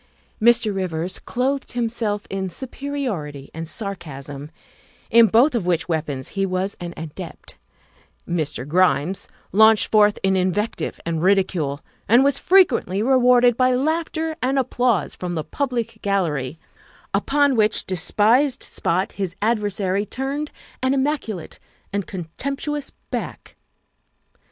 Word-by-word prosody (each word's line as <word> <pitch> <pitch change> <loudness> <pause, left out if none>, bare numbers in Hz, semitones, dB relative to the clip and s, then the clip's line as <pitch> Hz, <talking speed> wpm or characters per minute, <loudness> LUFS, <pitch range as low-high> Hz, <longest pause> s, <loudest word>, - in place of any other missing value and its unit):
Mr. 230 -2 +4
Rivers 180 -2 -2
clothed 270 +3 -2
himself 225 -3 -1
in 190 -1 -3
superiority 235 - -4
and 165 0 -6
sar 200 +3 -4
casm, 145 -3 -9 0.6
in 230 0 +7
both 245 +8 +4
of 215 -7 -1
which 175 -2 +1
weapons 150 -6 -2
he 195 - -2
was 190 +1 -1
an 175 -1 -6
adept; 160 +2 -8 0.7
Mr. 155 -6 -2
Grimes 180 +1 +2 0.2
launched 220 +1 +5
forth 210 -1 +5
in 190 0 +3
invective 190 +4 -1
and 165 -1 -1
ridicule, 180 -7 +1 0.3
and 240 +4 +6
was 280 -1 +2
frequently 250 - +3
rewarded 250 -1 +5
by 255 +1 +3
laughter 320 +3 -1
and 265 +2 +1
applause 245 -4 +1
from 175 -1 -4
the 155 - -2
public 235 - -3
gallery, 160 -9 -1 0.6
upon 285 -1 +2
which 215 -1 +2
despised 225 - +2
spot 185 +3 -1
his 190 -3 -4
adver 210 -1 +1
sary 195 0 -1
turned 275 +7 -3 0.3
an 260 +1 +2
immaculate 265 - -2 0.3
and 200 -2 -2
contemptuous 275 - -4 0.2
back. - - -5
205 Hz, 125 wpm, -22 LUFS, 175-255 Hz, 0.7 s, in